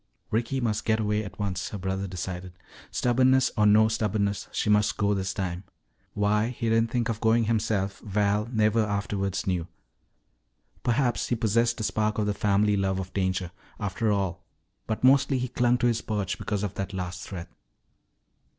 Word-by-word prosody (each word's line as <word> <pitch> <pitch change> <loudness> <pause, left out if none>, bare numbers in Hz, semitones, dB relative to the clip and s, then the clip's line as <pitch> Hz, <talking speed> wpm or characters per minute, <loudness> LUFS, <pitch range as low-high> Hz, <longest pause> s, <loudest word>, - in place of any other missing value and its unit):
Ricky 120 +5 0
must 110 -4 -1
get 110 0 +1
away 105 0 0
at 100 - -9
once, 95 -2 -2
her 105 - -5
brother 95 +1 -2
decided. 90 0 -5 0.4
Stubbornness 130 +1 +3
or 105 -2 +4
no 110 +1 +6
stubbornness, 105 -2 -1
she - - -2
must 105 0 +3
go 105 0 +2
this 95 -1 -1
time. 90 -1 -3 0.5
Why 105 +1 +2
he 115 -2 -2
didn't 115 0 +3
think 120 -1 0
of 115 -2 -3
going 115 +1 +3
himself 105 -3 0
Val 105 +1 0
never 110 -1 +2
afterwards 100 -2 -2
knew. 90 -3 -1 1.1
Perhaps 120 0 +1
he 120 - +1
possessed 115 +1 +1
a - - -2
spark 105 0 0
of 105 - +1
the 105 - 0
family 105 0 +2
love 95 -1 0
of 95 -1 -5
danger, 95 -2 -1 0.3
after 105 +1 -1
all, 100 -4 -1 0.4
but 110 +1 -3
mostly 135 +1 +5
he 125 0 -1
clung 125 0 +2
to 120 - 0
his 115 -1 +2
perch 105 -3 -2
because 105 -2 -2
of 100 - -2
that 100 0 -4
last 90 -1 -4
threat. 90 -4 -7
105 Hz, 175 wpm, -27 LUFS, 95-115 Hz, 1.1 s, no